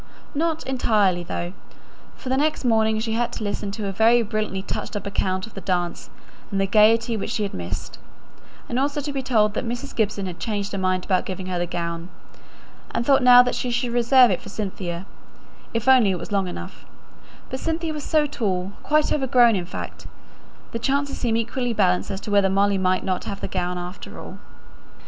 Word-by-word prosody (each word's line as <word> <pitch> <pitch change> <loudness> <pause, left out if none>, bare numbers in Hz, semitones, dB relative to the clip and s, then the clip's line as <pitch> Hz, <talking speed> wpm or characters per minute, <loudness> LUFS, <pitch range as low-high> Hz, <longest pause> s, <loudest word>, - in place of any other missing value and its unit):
Not 320 +1 -1
entirely 210 -8 +2
though; 175 +1 -4 0.6
for 255 - -8
the 260 - +2
next 300 -1 0
morning 220 -2 +3
she 220 0 -2
had 235 +1 0
to - - -5
listen 205 0 -3
to 210 -1 -4
a 195 - -1
very 230 +4 +4
brilliantly 215 -3 -2
touched 205 - -5
up 205 - -4
account 185 -2 -1
of 225 - -15
the 195 - -7
dance 175 -2 -2 0.4
and 195 - -1
the 195 - +2
gaiety 225 +3 +4
which 210 - -3
she 215 - -1
had 200 - -3
missed; 90 0 -5 0.7
and 240 - -1
also 285 +2 0
to 290 0 -4
be 270 - -1
told 220 -5 +2
that - - -2
Mrs. 240 0 -5
Gibson 205 -3 0
had 180 -2 -6
changed 205 -3 -2
her 195 - -3
mind 185 -1 0
about 185 -2 +1
giving 185 -1 -5
her 180 -1 -2
the 175 - -1
gown, 170 0 -4 0.8
and 235 - -2
thought 275 0 +5
now 250 0 +9
that 250 - -1
she 250 - -2
should 245 0 -1
reserve 245 0 +6
it 180 - -1
for - - -10
Cynthia, 190 -4 -4 0.7
if 230 +2 -3
only 255 -6 +6
it 185 - 0
was 170 - -8
long 195 -2 +1
enough; 180 - -8 0.7
but 260 - -3
Cynthia 325 +1 -2
was 300 -1 -5
so 310 -2 +2
tall 195 -9 -2
quite 305 0 +2
overgrown, 245 -5 +4
in 180 -2 -3
fact. - - -7 0.6
The 230 - -3
chances 280 +3 -1
seemed 230 -3 +1
equally 235 +1 -1
balanced 185 -4 +2
as 195 0 -4
to 210 - -6
whether 200 -1 +4
Molly 200 0 +2
might 185 0 +1
not 185 -1 -2
have 200 - -5
the - - -3
gown 180 -1 -2
after 180 +2 -7
all. - - -9
215 Hz, 205 wpm, -23 LUFS, 190-245 Hz, 0.8 s, now